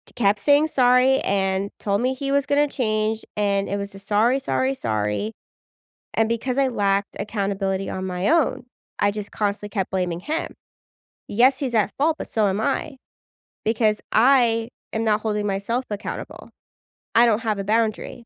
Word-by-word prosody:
kept 205 -3 +2
saying 290 +7 +4
sorry 255 -1 +4
and 195 0 0
told 200 +1 0
me 255 +1 +1
he 275 +1 -4
was 280 -1 +2
gonna 290 +1 +2
change, 220 -4 -1
and 200 -1 +1
it 200 - -1
was 200 0 -5
a, 195 - -9
"Sorry, 215 +6 +2
sorry, 130 - 0
sorry." 110 - -2 0.8
And 225 - +3
because 245 +3 -2
I 270 -1 +3
lacked 200 -3 0
accountability 195 -2 -2
on 190 0 -4
my 180 +1 -1
own, 320 -6 +2 0.3
I 205 - +3
just 205 0 -6
constantly 205 0 -2
kept 195 -3 -2
blaming 180 -3 -1
him. 310 - -3 0.7
Yes, 255 +5 +3
he's 255 -4 -2
at 210 -2 +2
fault, 310 +3 +2
but - - -7
so 215 -2 +2
am 195 +2 -1
I, 285 +5 -1 0.7
because 215 -1 +2
I 230 -2 +4 0.2
am 220 +1 -1
not 215 -1 +2
holding 210 -1 -1
myself 205 +6 -1
accountable. 205 +1 -6 0.7
I 235 - +7
don't 225 -2 +3
have 220 -3 -1
a - - -2
boundary. 220 +2 -1
215 Hz, 170 wpm, -23 LUFS, 200-245 Hz, 0.8 s, I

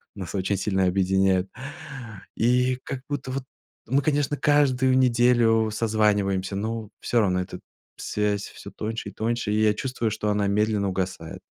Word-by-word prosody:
нас 95 -2 -6
очень 95 +1 0
сильно 95 -1 +1
объединяют. 95 0 +2 0.9
И 125 +2 +2
как 135 -2 -5
будто 145 -2 -3
вот, 135 0 -3 0.4
мы, 135 +4 +2
конечно, 145 0 0
каждую 130 -3 +3
неделю 120 -3 +4
созваниваемся, 105 -4 +1
но 110 +1 -3
всё 120 - +1
равно 90 -2 +1
эта 90 - -7 0.4
связь 105 -1 -1
всё - - -11
тоньше 115 +2 -4
и - - -14
тоньше, 115 -1 -1
и 105 +1 +2
я 105 -1 +4
чувствую, 115 0 -2
что 105 -1 -2
она 105 -1 +1
медленно 105 0 +1
угасает. 90 -3 -4
110 Hz, 150 wpm, -25 LUFS, 100-125 Hz, 0.9 s, неделю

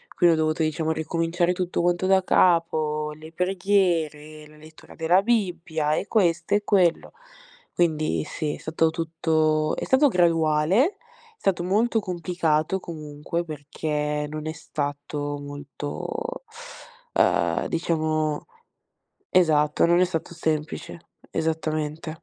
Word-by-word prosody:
Quindi 175 -2 +5
ho - - -2
dovuto 155 +1 +1
diciamo 155 +1 -1
ricominciare 165 +2 0
tutto 180 -1 -2
quanto 175 +1 +1
da 190 0 +5
capo, 155 -4 +2
le 155 +1 -12
preghiere, 170 -5 0
la 155 0 -18
lettura 155 +1 -15
della 170 +3 +3
Bibbia, 175 -9 0
e 200 - -2
questo 175 -4 +2
e 205 - +1
quello. 180 -5 +2 0.6
Quindi 155 -3 +1
sì, 150 -1 -3
è - - -11
stato 160 +1 +1
tutto 160 -1 0
è - - -3
stato 275 +2 +4
graduale, 165 -2 +2
è 465 +2 -16
stato 180 -3 +2
molto 220 +5 +2
complicato 175 -2 0
comunque, 155 0 -5
perché 150 0 -3
non 155 0 -6
è - - -1
stato 145 -1 -4
molto 145 - -6 0.7
ehm, - - +2
diciamo 155 -2 -1 0.9
esatto, 150 -5 +3
non 170 +1 +4
è - - +6
stato 170 -1 -4
semplice, 160 0 -3 0.3
esattamente. 155 0 -3
160 Hz, 120 wpm, -25 LUFS, 155-180 Hz, 0.9 s, è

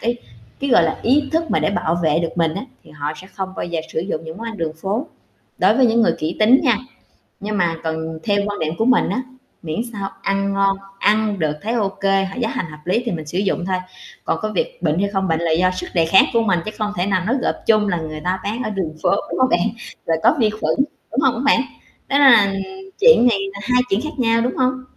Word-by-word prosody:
cái 240 +1 -1 0.4
cái, 275 -1 -1
gọi 205 - +6
là, 160 -1 0
ý 275 +4 +2
thức 325 0 0
mà - - +2
để - - +1
bảo 175 -3 0
vệ 155 -1 +2
được 165 -1 -1
mình 165 -2 +1
á 195 - -4 0.2
thì - - -16
họ 150 0 -4
sẽ 185 - -11
không 190 0 -5
bao - - -3
giờ 170 -2 -2
sử - - -1
dụng 165 -2 -4
những 160 +1 -8
món 230 - -7
ăn 225 -2 -5
đường 160 -3 -2
phố, 215 +10 -1 0.5
đối 200 +5 +4
với 260 -1 +5
những 230 0 +3
người 240 - +3
kỹ 160 +3 -3
tính 235 +5 +6
nha. 245 -7 +3 0.6
Nhưng 210 0 -3
mà 170 -3 +1
còn 160 0 -4
theo 205 -2 +1
quan 205 0 -4
niệm 160 0 -1
của 225 - +1
mình 250 -2 +3
á, 255 - -1 0.4
miễn 160 +1 -4
sao 200 -2 -4
ăn 195 0 0
ngon, 195 0 +2 0.2
ăn 210 -1 +2
được 155 -2 0
thấy 225 +3 -2
ô 215 -5 +1
kê, 195 0 0
giá 225 -2 0
hành 185 - -3
hợp 150 - -11
lý 185 +7 +1
thì 235 - -1
mình 160 -4 -4
sử 155 +4 -5
dụng 190 -2 -1
thôi. 185 0 0 0.5
Còn 160 - 0
có 215 - -2
việc - - -2
bệnh 160 0 +1
hay 200 +1 +1
không 195 -1 -1
bệnh 160 -1 +1
là 170 -1 0
do 180 +3 +3
sức 185 - -5
đề 165 -2 +3
kháng 180 +4 +6
của 230 - +3
mình, 195 -6 +2
chứ 215 - -4
không 215 -1 -1
thể 180 - +1
nào 185 -2 0
nói 235 +5 +1
gộp - - 0
chung 215 -2 +4
là 180 -3 0
người 155 -1 -6
ta 185 +3 -1
bán 225 +5 -3
ở - - -2
đường 190 -7 -3
phố, - - +3 0.2
đúng - - -3
hông 260 0 +4
bạn? - - +3 0.5
Rồi 165 - +1
có - - +5
vi 220 -3 +4
khuẩn, 215 +1 -1 0.4
đúng 260 - 0
hông 265 -4 +3
hả 240 - -3
bạn? 285 - +5 0.5
Nên 280 +1 +3
là 230 -8 +7 0.5
chuyện 475 - +7
này 230 -5 +3 0.2
là 200 - -8
hai 250 +1 +3
chuyện 195 +3 +1
khác 305 +1 -5
nhau, 230 -1 +3
đúng 245 +2 -1
hông? 255 0 0
200 Hz, 265 wpm, -20 LUFS, 170-230 Hz, 0.6 s, là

